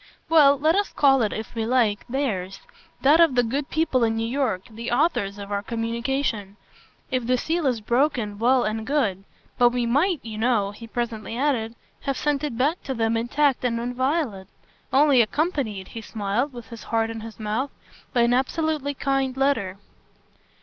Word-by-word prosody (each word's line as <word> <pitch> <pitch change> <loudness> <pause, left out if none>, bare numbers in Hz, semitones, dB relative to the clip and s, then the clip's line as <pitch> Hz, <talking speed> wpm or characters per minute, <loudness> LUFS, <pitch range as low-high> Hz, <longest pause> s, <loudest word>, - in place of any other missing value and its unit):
"Well, 290 -3 +6
let 310 +4 +2
us 405 0 0
call 270 -2 +4
it, 215 - +1
if 220 0 -6
we 225 -1 -2
like, 225 -3 +1
theirs 205 -8 -2 0.4
that 295 +4 +6
of 325 -6 +5
the 245 - +4
good 275 +5 -2
people 315 -6 +1
in 225 -1 +2
New 225 0 -1
York, 240 -7 -1
the 230 +1 -6
authors 240 - +1
of 200 0 -8
our 200 0 0
communication. 230 -2 -2 0.5
If 255 -2 -1
the 255 0 +3
seal 320 +3 -1
is 240 -4 0
broken 235 -3 0
well 250 +2 +3
and 220 +1 -3
good; 205 -10 0 0.3
but 245 -1 +6
we 245 0 -1
MIGHT, 295 +7 +2
you 220 -2 -6
know," 220 -4 +1
he 230 +3 -11
presently 230 -1 -4
added, 245 -5 0 0.2
"have 275 -1 -2
sent 295 -1 0
it 285 -6 -3
back 295 +8 +1
to 265 - -3
them 225 0 +1
intact 260 +4 +1
and 235 -2 0
inviolate. 245 - -1 0.4
Only 275 -2 +5
accompanied," 230 - -1
he 230 - -7
smiled 220 +5 -2
with 240 -2 -10
his 230 -2 -10
heart 225 0 0
in 225 - -6
his 225 0 -10
mouth, 220 +6 -2 0.4
"by 245 - +2
an 235 +1 +3
absolutely 285 +2 0
kind 270 -1 -1
letter." 230 -9 +1
245 Hz, 180 wpm, -24 LUFS, 225-275 Hz, 0.5 s, Well